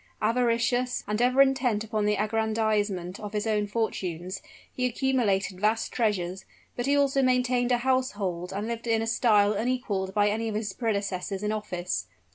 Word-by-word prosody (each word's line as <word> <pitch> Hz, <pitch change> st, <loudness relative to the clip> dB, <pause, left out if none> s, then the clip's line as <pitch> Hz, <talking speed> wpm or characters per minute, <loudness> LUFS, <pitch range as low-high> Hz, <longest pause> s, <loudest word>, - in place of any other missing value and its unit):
Avaricious, 245 Hz, +2 st, +1 dB
and 210 Hz, +2 st, -1 dB
ever 255 Hz, +2 st, +6 dB
intent 255 Hz, -5 st, +1 dB
upon 215 Hz, -1 st, -1 dB
the 210 Hz, -, +2 dB
aggrandizement 215 Hz, -4 st, 0 dB
of 210 Hz, 0 st, -7 dB
his 210 Hz, 0 st, -1 dB
own 210 Hz, -2 st, +1 dB
fortunes, 190 Hz, -4 st, -3 dB, 0.3 s
he 250 Hz, 0 st, +1 dB
accumulated 225 Hz, -7 st, 0 dB
vast 220 Hz, +2 st, +1 dB
treasures; 190 Hz, -5 st, -1 dB, 0.3 s
but 245 Hz, +2 st, -2 dB
he 285 Hz, +1 st, +3 dB
also 275 Hz, -1 st, +3 dB
maintained 250 Hz, -1 st, +2 dB
a 245 Hz, -, +4 dB
household 210 Hz, -9 st, -1 dB
and 200 Hz, +2 st, -3 dB
lived 235 Hz, 0 st, -4 dB
in 225 Hz, -1 st, +2 dB
a -, -, -2 dB
style 215 Hz, -3 st, +3 dB
unequaled 210 Hz, -4 st, -1 dB
by 205 Hz, 0 st, +4 dB
any 225 Hz, +2 st, -1 dB
of 215 Hz, -, -4 dB
his 210 Hz, -2 st, -2 dB
predecessors 200 Hz, -3 st, -2 dB
in 210 Hz, -, 0 dB
office. 180 Hz, -, -3 dB
220 Hz, 165 wpm, -27 LUFS, 200-245 Hz, 0.3 s, ever